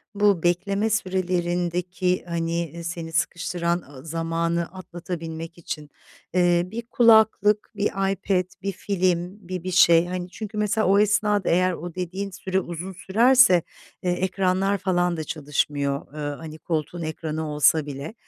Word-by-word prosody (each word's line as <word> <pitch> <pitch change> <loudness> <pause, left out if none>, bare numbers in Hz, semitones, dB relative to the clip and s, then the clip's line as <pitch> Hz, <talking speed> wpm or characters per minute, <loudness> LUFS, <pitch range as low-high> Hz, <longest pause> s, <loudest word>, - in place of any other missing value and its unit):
bu 205 -4 +3
bekleme 195 +5 +1
sürelerindeki, 180 -2 -1
hani, 170 -1 -2
ııı, 170 - -7
seni 170 -1 -5
sıkıştıran, 170 0 0
ııı, 135 0 -12
zamanı 165 +1 -1
atlatabilmek 170 -2 -7
için, 150 -3 -6 0.4
eee, 175 -1 +3
bir 230 +2 -4
kulaklık, 220 -2 +4
bir 205 0 -1
iPad, 195 -1 0 0.2
bir 195 - -2
film, 185 0 -1
bir 180 -1 -4
bir 185 - -3
şey, 170 -1 +6
hani, 180 0 -4
çünkü 215 +2 -7
mesela 210 0 +1
o 200 +2 +5
esnada 210 -1 +2
eğer 185 +2 +3
o 175 0 -7
dediğin 185 +2 -4
süre 190 0 -1
uzun 175 +1 -6
sürerse, 225 -4 +6 0.4
eee, 180 - +1
ekranlar 190 +2 +1
falan 175 -2 0
da 160 - -3
çalışmıyor, 145 -2 -2
ııı, 145 -1 -4
hani, 155 +1 -9
koltuğun 160 +2 -3
ekranı 160 0 -4
olsa 150 +1 +3
bile. 145 +5 -6
175 Hz, 140 wpm, -24 LUFS, 165-195 Hz, 0.4 s, şey